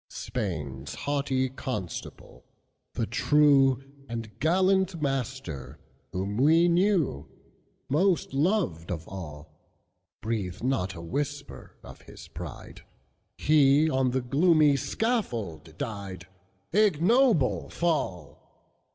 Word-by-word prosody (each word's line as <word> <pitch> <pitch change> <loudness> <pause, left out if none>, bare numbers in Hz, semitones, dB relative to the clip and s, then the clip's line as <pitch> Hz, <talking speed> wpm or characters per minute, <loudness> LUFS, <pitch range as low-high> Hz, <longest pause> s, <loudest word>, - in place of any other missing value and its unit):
Spain's 75 - -5
haughty 140 -1 0
Constable, 115 -8 -6 0.5
the - - 0
trueAnd 135 -5 +2
gallant 185 +2 +2
Master, 130 - -3 0.3
whom 100 +3 -3
we 160 +6 +5
knewMost 175 - -1
loved 140 - 0
of 80 -2 -5
all; 75 -5 -9 0.6
Breathe 105 -4 -3
not 95 -8 -1
a 85 - -8
whisper 140 - -5
of - - -12
his - - -13
pride, - - -9 0.6
He 150 +1 +4
on 130 -1 +2
the 130 +1 0
gloomy 150 +3 +4
scaffold 125 - -2
died, 100 -9 -6 0.5
Ignoble 210 - +3
fall! 135 - -3
135 Hz, 90 wpm, -27 LUFS, 95-155 Hz, 0.6 s, we